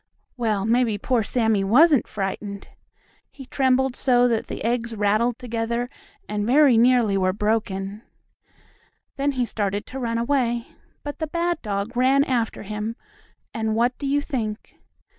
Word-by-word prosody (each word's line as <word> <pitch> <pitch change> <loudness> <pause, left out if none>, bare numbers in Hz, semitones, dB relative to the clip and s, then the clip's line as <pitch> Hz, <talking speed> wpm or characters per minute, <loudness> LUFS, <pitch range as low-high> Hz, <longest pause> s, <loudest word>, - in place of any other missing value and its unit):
Well, 215 -5 -1
maybe 230 -1 +2
poor 240 +3 0
Sammie 220 -2 +1
wasn't 275 - +5
frightened! 200 0 -5 0.6
He 270 - -12
trembled 260 -1 +1
so 245 -2 +3
that 230 -2 -1
the - - -6
eggs 235 0 -1
rattled 215 +3 +1
together 235 0 -3 0.4
and 210 0 -2
very 275 0 +5
nearly 235 -3 +4
were 185 -1 +1
broken. 205 -1 -2 1.2
Then 280 +1 0
he 250 -2 0
started 205 -2 -2
to 265 - -7
run 230 -2 -1
away, 235 -1 0 0.3
but 290 0 -6
the 315 - -2
bad 340 +1 -1
dog 205 +2 -3
ran 265 +3 +4
after 240 -7 -1
him, 210 +2 -4 0.6
and 220 -1 -1
what 240 +2 +2
do 280 - -3
you 285 +1 +1
think? 225 -8 -5
235 Hz, 145 wpm, -23 LUFS, 210-255 Hz, 1.2 s, wasn't